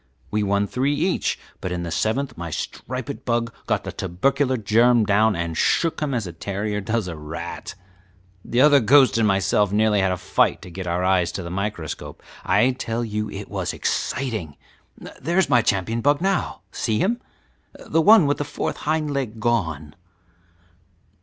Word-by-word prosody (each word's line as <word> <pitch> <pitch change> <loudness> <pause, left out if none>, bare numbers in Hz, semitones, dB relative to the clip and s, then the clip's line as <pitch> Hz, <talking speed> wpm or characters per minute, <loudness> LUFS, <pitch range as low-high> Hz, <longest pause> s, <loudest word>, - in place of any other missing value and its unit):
We 105 - +1
won 100 0 +1
three 135 +7 0
each, 175 +5 0 0.2
but 95 - -4
in 90 -1 -3
the 85 - -5
seventh 130 - -1
my 85 0 -6
striped 130 - -5
bug 115 -1 -1
got - - 0
the - - -5
tubercular 130 +9 0
germ 115 +2 +4
down 105 +1 +3
and 85 -1 -3
shook 165 - +1
him 145 -4 -1
as 115 -4 -1
a 85 - -7
terrier 100 +4 -3
does 110 0 -1
a 85 - -5
rat. 75 0 -7 0.7
The 120 - +1
other 145 0 +7
ghost 130 +1 +5
and 110 - +3
myself 100 0 +2
nearly 105 0 +3
had 95 -1 +2
a 90 - -1
fight - - +1
to 90 - -10
get 90 +1 -6
our 90 +1 0
eyes 90 -2 +2
to 95 - -4
the 85 - -6
microscope. 100 -4 -5 0.2
I 105 +7 +3
tell 120 -2 -3
you 105 -1 -3
it - - -7
was - - -3
exciting. 110 - -2 0.6
There 170 +7 -1
is 190 -6 +3
my 120 -2 +6
champion 110 +3 0
bug 145 +3 +3
now, 195 +2 -1
see 110 -3 -1
him? 235 - 0 0.5
the 165 - 0
one 210 0 +7
with 145 0 0
the - - 0
fourth 145 - -4
hind 155 -1 -1
leg 120 -5 -3
gone." 80 -11 -1
110 Hz, 180 wpm, -23 LUFS, 95-135 Hz, 0.7 s, other